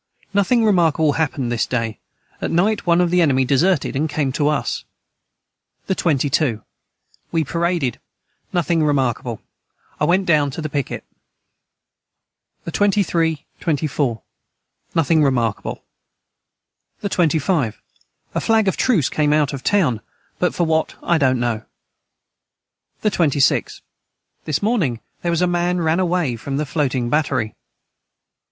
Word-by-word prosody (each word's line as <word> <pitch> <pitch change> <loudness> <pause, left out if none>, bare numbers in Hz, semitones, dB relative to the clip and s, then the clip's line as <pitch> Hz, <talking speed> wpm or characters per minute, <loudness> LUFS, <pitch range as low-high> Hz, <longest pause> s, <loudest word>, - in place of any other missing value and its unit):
Nothing 220 +4 +3
remarkable 165 -6 +3
hapened 135 -6 -1
this 120 - 0
day 115 -3 -2 0.4
at - - -1
night 200 +4 +1
one 170 +1 +4
of 175 -1 +1
the 180 0 +4
enemy 135 -5 +3
deserted 150 +6 +2
and 155 +4 0
came 145 -2 -1
to 145 +2 0
us. 150 -2 -1 1.0
the - - 0
22. 140 - +1 0.7
We 165 -1 +1
paraded 170 -4 -1 0.5
nothing 170 -1 +1
remarkable 130 -5 0 0.6
I - - +2
went 185 +2 +2
down 150 -4 +3
to - - -3
the 155 - -3
piquet. 140 -3 -3 1.6
the 170 - -5
23, 165 -6 +1
24. 145 - -1 0.7
Nothing 160 0 +3
remarkable. 120 -6 -1 1.2
the - - -1
25. 160 - +1 0.5
A - - -1
flag 220 -2 +2
of 190 - +2
truce 210 - +2
came 150 -1 +1
out 150 -1 +2
of 135 - -6
town 150 - +2 0.4
but 180 - +1
for 175 - +1
what 160 -1 0
I 170 -2 +2
dont 130 -3 +3
know. 120 -2 -1 1.4
the 215 - +1
26. 145 -7 +1 0.6
This 155 +4 -1
morning 180 - +1 0.2
their 175 - -1
was 170 +1 +1
a - - +5
man 175 0 0
ran 160 +1 +1
away 175 -9 0
from 135 +4 -4
the 150 - -1
floating 130 -5 -1
battery. 135 -7 0
155 Hz, 135 wpm, -20 LUFS, 135-175 Hz, 1.6 s, a